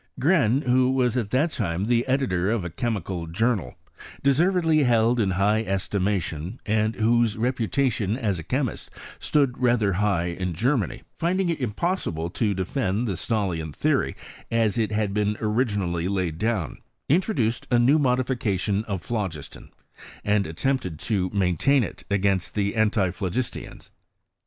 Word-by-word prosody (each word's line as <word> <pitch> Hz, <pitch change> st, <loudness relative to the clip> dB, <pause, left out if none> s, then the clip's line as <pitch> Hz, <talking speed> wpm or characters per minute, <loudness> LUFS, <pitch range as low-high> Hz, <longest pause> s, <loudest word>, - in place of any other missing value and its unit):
Gren, 140 Hz, -, +3 dB
who 125 Hz, 0 st, +3 dB
was 125 Hz, -3 st, +1 dB
at 115 Hz, -5 st, -1 dB
that 145 Hz, +8 st, +1 dB
time 95 Hz, -, -2 dB
the 120 Hz, +2 st, +1 dB
editor 125 Hz, -9 st, +1 dB
of 110 Hz, -5 st, 0 dB
a 90 Hz, -, -5 dB
chemical 95 Hz, -4 st, -3 dB
journal, 100 Hz, -, 0 dB, 0.5 s
deservedly 160 Hz, +3 st, +3 dB
held 120 Hz, -2 st, +3 dB
in 105 Hz, -4 st, +2 dB
high 100 Hz, +4 st, +2 dB
estimation, 95 Hz, -2 st, -2 dB
and 110 Hz, +1 st, +1 dB
whose 115 Hz, 0 st, +2 dB
reputation 120 Hz, -2 st, 0 dB
as 105 Hz, -9 st, -1 dB
a -, -, -6 dB
chemist 130 Hz, -, -2 dB, 0.3 s
stood 140 Hz, -5 st, +1 dB
rather 120 Hz, -5 st, +2 dB
high 95 Hz, -2 st, +1 dB
in 90 Hz, +1 st, -3 dB
Gcermany, 115 Hz, -, 0 dB, 0.2 s
finding 180 Hz, +2 st, +1 dB
it 165 Hz, -4 st, -2 dB
impossible 105 Hz, -, -2 dB
to 105 Hz, 0 st, 0 dB
defend 100 Hz, +3 st, -1 dB
the 100 Hz, -, -1 dB
Stahliaa 85 Hz, -, -2 dB
theory -, -, +1 dB, 0.3 s
as 115 Hz, -3 st, +1 dB
it 110 Hz, -3 st, 0 dB
had 105 Hz, -2 st, 0 dB
been 105 Hz, 0 st, 0 dB
originally 105 Hz, -7 st, 0 dB
laid 90 Hz, -5 st, -2 dB
down, 110 Hz, -6 st, -1 dB, 0.3 s
intro 185 Hz, +9 st, +2 dB
duced 115 Hz, -3 st, -1 dB
a 120 Hz, -, +4 dB
new 130 Hz, +6 st, +4 dB
modification 120 Hz, -7 st, 0 dB
of 100 Hz, -5 st, -4 dB
phlogiston, 95 Hz, -11 st, -5 dB, 0.5 s
and 105 Hz, -1 st, +1 dB
at 80 Hz, +1 st, -9 dB
tempted 130 Hz, -, -1 dB
to 95 Hz, +1 st, -1 dB
maintain 100 Hz, -, +2 dB
it -, -, -7 dB
against 100 Hz, -2 st, 0 dB
the 100 Hz, -1 st, 0 dB
antiphlogistians. 105 Hz, 0 st, -1 dB
110 Hz, 145 wpm, -25 LUFS, 95-125 Hz, 0.5 s, a